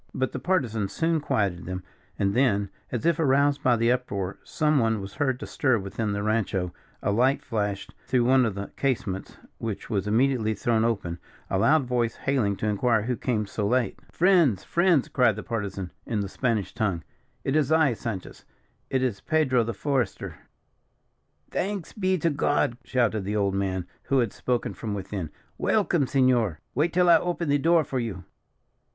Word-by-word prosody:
But 130 Hz, 0 st, 0 dB
the -, -, -4 dB
Partisan 125 Hz, -, 0 dB
soon 165 Hz, +5 st, 0 dB
quieted 100 Hz, -, -1 dB
them; 90 Hz, 0 st, -4 dB, 0.3 s
and 100 Hz, 0 st, +1 dB
then, 100 Hz, -6 st, +2 dB, 0.2 s
as 120 Hz, +2 st, -3 dB
if 170 Hz, -2 st, +2 dB
aroused 140 Hz, -1 st, +3 dB
by 125 Hz, -2 st, +4 dB
the 115 Hz, +1 st, +3 dB
uproar, 100 Hz, -7 st, -2 dB
some 150 Hz, -1 st, +1 dB
one 115 Hz, -2 st, +1 dB
was 95 Hz, 0 st, -7 dB
heard 135 Hz, -4 st, 0 dB
to -, -, -6 dB
stir 130 Hz, -4 st, +1 dB
within 105 Hz, +2 st, -3 dB
the 100 Hz, 0 st, -2 dB
rancho, 100 Hz, -5 st, 0 dB, 0.3 s
a -, -, +1 dB
light 125 Hz, +6 st, +2 dB
flashed 105 Hz, -4 st, -3 dB
through 125 Hz, -1 st, +2 dB
one 130 Hz, +1 st, +5 dB
of 110 Hz, -5 st, -1 dB
the 100 Hz, 0 st, -6 dB
casements, 120 Hz, -8 st, -2 dB, 0.2 s
which 115 Hz, 0 st, -5 dB
was 100 Hz, -2 st, 0 dB
immediately 115 Hz, -1 st, +2 dB
thrown 110 Hz, +2 st, +1 dB
open 100 Hz, -7 st, -1 dB, 0.3 s
a 95 Hz, -, +1 dB
loud 140 Hz, +6 st, +4 dB
voice 120 Hz, -2 st, 0 dB
hailing 125 Hz, -8 st, 0 dB
to 105 Hz, -, -3 dB
inquire 110 Hz, +1 st, +2 dB
who 125 Hz, +2 st, -1 dB
came 110 Hz, -3 st, -1 dB
so 100 Hz, +1 st, -2 dB
late. 125 Hz, +2 st, 0 dB
"Friends, 170 Hz, -, +3 dB
friends!" 170 Hz, -5 st, +2 dB
cried 125 Hz, -5 st, +3 dB
the 110 Hz, -, -6 dB
Partisan, 100 Hz, -5 st, -4 dB, 0.2 s
in 110 Hz, -3 st, -1 dB
the 100 Hz, -, -3 dB
Spanish 115 Hz, -3 st, -1 dB
tongue. 100 Hz, -8 st, -1 dB, 0.4 s
"It 135 Hz, -, 0 dB
is 155 Hz, -2 st, +2 dB
I, 160 Hz, -5 st, +4 dB
Sanchez; 110 Hz, -4 st, -6 dB, 0.5 s
it 130 Hz, -1 st, +1 dB
is 120 Hz, -6 st, -1 dB
Pedro, 140 Hz, -7 st, +2 dB
the 115 Hz, -1 st, -4 dB
Forester." 130 Hz, -3 st, -1 dB, 1.2 s
"Thanks 195 Hz, -3 st, -3 dB
be 185 Hz, -2 st, +1 dB
to 165 Hz, 0 st, +1 dB
God!" 145 Hz, -3 st, +1 dB
shouted 115 Hz, -5 st, 0 dB
the 105 Hz, +2 st, -2 dB
old 100 Hz, -2 st, +1 dB
man, 95 Hz, -2 st, -1 dB, 0.2 s
who 135 Hz, -, +1 dB
had 120 Hz, -5 st, +1 dB
spoken 125 Hz, -1 st, -1 dB
from 105 Hz, -3 st, -4 dB
within; 95 Hz, -4 st, -4 dB, 0.3 s
"welcome, 175 Hz, -9 st, +2 dB
senor. 125 Hz, -, +2 dB
Wait 155 Hz, +6 st, +1 dB
till 180 Hz, +1 st, +3 dB
I 170 Hz, -1 st, +8 dB
open 175 Hz, -2 st, -2 dB
the 145 Hz, 0 st, +3 dB
door 165 Hz, +2 st, +4 dB
for 130 Hz, -2 st, -3 dB
you." 105 Hz, -6 st, -4 dB
120 Hz, 180 wpm, -26 LUFS, 100-140 Hz, 1.2 s, I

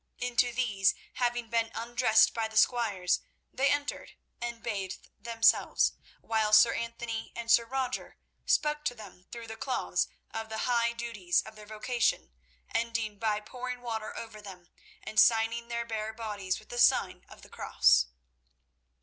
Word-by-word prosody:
Into 245 Hz, 0 st, +1 dB
these, 225 Hz, -6 st, +2 dB, 0.2 s
having 240 Hz, -1 st, -1 dB
been 230 Hz, -1 st, +1 dB
undressed 230 Hz, -1 st, +3 dB
by 225 Hz, -1 st, -1 dB
the 220 Hz, 0 st, -6 dB
squires, 205 Hz, -7 st, +2 dB, 0.3 s
they 275 Hz, +2 st, +2 dB
entered 290 Hz, +1 st, -2 dB, 0.3 s
and 235 Hz, -1 st, -5 dB
bathed 195 Hz, -5 st, -4 dB
themselves, 230 Hz, -1 st, +3 dB, 0.3 s
while 220 Hz, -1 st, 0 dB
Sir 220 Hz, +2 st, +7 dB
Anthony 230 Hz, -1 st, -4 dB
and 235 Hz, -1 st, -2 dB
Sir 235 Hz, -, +6 dB
Roger 255 Hz, +1 st, -3 dB, 0.3 s
spoke 300 Hz, 0 st, +2 dB
to 245 Hz, -, 0 dB
them 190 Hz, -5 st, -13 dB
through 235 Hz, -1 st, -7 dB
the 225 Hz, 0 st, -7 dB
cloths 255 Hz, +2 st, -1 dB, 0.2 s
of 225 Hz, 0 st, -5 dB
the 220 Hz, 0 st, -3 dB
high 235 Hz, -1 st, +2 dB
duties 230 Hz, -7 st, -1 dB
of 220 Hz, -, -12 dB
their 210 Hz, -1 st, -12 dB
vocation, 220 Hz, -, -1 dB, 0.4 s
ending 230 Hz, -3 st, -1 dB
by 215 Hz, -2 st, 0 dB
pouring 250 Hz, +2 st, -6 dB
water 225 Hz, -3 st, -5 dB
over 220 Hz, -2 st, -8 dB
them, 185 Hz, -4 st, -12 dB, 0.3 s
and 215 Hz, 0 st, 0 dB
signing 230 Hz, 0 st, +4 dB
their 235 Hz, 0 st, -3 dB
bare 220 Hz, -1 st, -4 dB
bodies 210 Hz, -4 st, -3 dB
with 215 Hz, -, -15 dB
the 240 Hz, -, -4 dB
sign -, -, +3 dB
of -, -, -14 dB
the -, -, -13 dB
Cross. 60 Hz, 0 st, +3 dB
230 Hz, 155 wpm, -30 LUFS, 215-240 Hz, 0.4 s, Sir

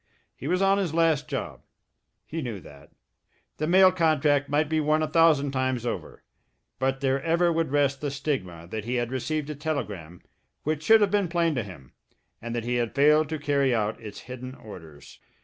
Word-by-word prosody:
He 135 Hz, -, -7 dB
was 180 Hz, +4 st, +1 dB
on 195 Hz, +1 st, +3 dB
his 175 Hz, -5 st, -2 dB
last 160 Hz, -3 st, +2 dB
job 135 Hz, -4 st, -5 dB, 0.6 s
he 165 Hz, +1 st, -5 dB
knew 120 Hz, -7 st, -5 dB
that. 70 Hz, -3 st, -15 dB, 0.7 s
The 155 Hz, -, -2 dB
mail 185 Hz, +2 st, +6 dB
contract 150 Hz, -5 st, +2 dB
might 150 Hz, +2 st, +1 dB
be 160 Hz, +1 st, 0 dB
won 155 Hz, +1 st, +2 dB
a -, -, 0 dB
thousand 155 Hz, -4 st, +3 dB
times 130 Hz, -2 st, -1 dB
over, 120 Hz, -, -5 dB, 0.6 s
but 135 Hz, +1 st, -1 dB
there 135 Hz, 0 st, +1 dB
ever 170 Hz, +2 st, +2 dB
would 165 Hz, -2 st, 0 dB
rest 140 Hz, -1 st, +1 dB
the 145 Hz, -, -1 dB
stigma 130 Hz, -, -4 dB
that 110 Hz, -1 st, -4 dB
he 125 Hz, +2 st, -2 dB
had 120 Hz, 0 st, -1 dB
received 150 Hz, +3 st, -2 dB
a -, -, -6 dB
telegram 105 Hz, -, -5 dB, 0.4 s
which 155 Hz, 0 st, -1 dB
should 220 Hz, +6 st, +5 dB
have 200 Hz, -2 st, +3 dB
been 205 Hz, -3 st, +2 dB
plain 170 Hz, -1 st, +1 dB
to 125 Hz, -, -1 dB
him, 90 Hz, -, -11 dB, 0.5 s
and 115 Hz, +1 st, -5 dB
that 120 Hz, -, -2 dB
he 120 Hz, 0 st, 0 dB
had 120 Hz, 0 st, -2 dB
failed 150 Hz, +2 st, +4 dB
to 160 Hz, -, -2 dB
carry 140 Hz, -3 st, +1 dB
out 110 Hz, 0 st, -2 dB
its 105 Hz, -2 st, -9 dB
hidden 130 Hz, +1 st, -8 dB
orders. 80 Hz, -, -13 dB
140 Hz, 195 wpm, -26 LUFS, 120-155 Hz, 0.7 s, mail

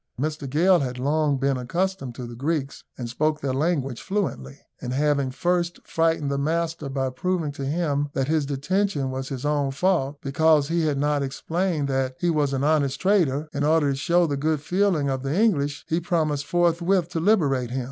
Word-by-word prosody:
Mr 150 Hz, -1 st, -3 dB
Gale 175 Hz, +6 st, +4 dB
had 125 Hz, -2 st, -3 dB
long 145 Hz, +2 st, +1 dB
been 135 Hz, 0 st, 0 dB
accustomed 140 Hz, 0 st, -2 dB
to 125 Hz, -, -6 dB
the 120 Hz, -, -8 dB
Greeks, 140 Hz, +2 st, -3 dB
and 120 Hz, -, -4 dB
spoke 150 Hz, +5 st, 0 dB
their 135 Hz, -3 st, -2 dB
language 135 Hz, -4 st, -1 dB
fluently; 175 Hz, -, -3 dB, 0.2 s
and 125 Hz, -, -4 dB
having 140 Hz, -1 st, +1 dB
first 175 Hz, +4 st, -1 dB
frightened 160 Hz, -3 st, 0 dB
the 140 Hz, -, -1 dB
master 160 Hz, 0 st, -1 dB
by 135 Hz, -1 st, -1 dB
proving 170 Hz, +2 st, -1 dB
to 140 Hz, -1 st, -6 dB
him 145 Hz, -2 st, 0 dB
that 135 Hz, -1 st, -1 dB
his 155 Hz, -2 st, +1 dB
detention 145 Hz, 0 st, -1 dB
was 130 Hz, 0 st, -4 dB
his 135 Hz, 0 st, -5 dB
own 145 Hz, -2 st, +1 dB
fault, 145 Hz, -1 st, 0 dB
because 150 Hz, +1 st, +2 dB
he 165 Hz, -1 st, +1 dB
had 145 Hz, -2 st, 0 dB
not 145 Hz, 0 st, +1 dB
explained 160 Hz, +3 st, -1 dB
that 130 Hz, -1 st, -1 dB
he 175 Hz, -1 st, +1 dB
was 150 Hz, -3 st, +1 dB
an 135 Hz, 0 st, -1 dB
honest 145 Hz, -2 st, +1 dB
trader, 160 Hz, -7 st, +2 dB
in 145 Hz, 0 st, -1 dB
order 150 Hz, -1 st, +3 dB
to -, -, -1 dB
show 170 Hz, +5 st, +2 dB
the 145 Hz, -3 st, -1 dB
good 155 Hz, +2 st, 0 dB
feeling 175 Hz, -1 st, +1 dB
of 135 Hz, -1 st, -1 dB
the 140 Hz, +7 st, -1 dB
English, 145 Hz, -10 st, +1 dB
he 165 Hz, -, +1 dB
promised 155 Hz, -5 st, -1 dB
forthwith 175 Hz, +1 st, +2 dB
to 170 Hz, -, -2 dB
liberate 150 Hz, -, +2 dB
him. 130 Hz, +2 st, -2 dB
145 Hz, 195 wpm, -24 LUFS, 135-170 Hz, 0.2 s, Gale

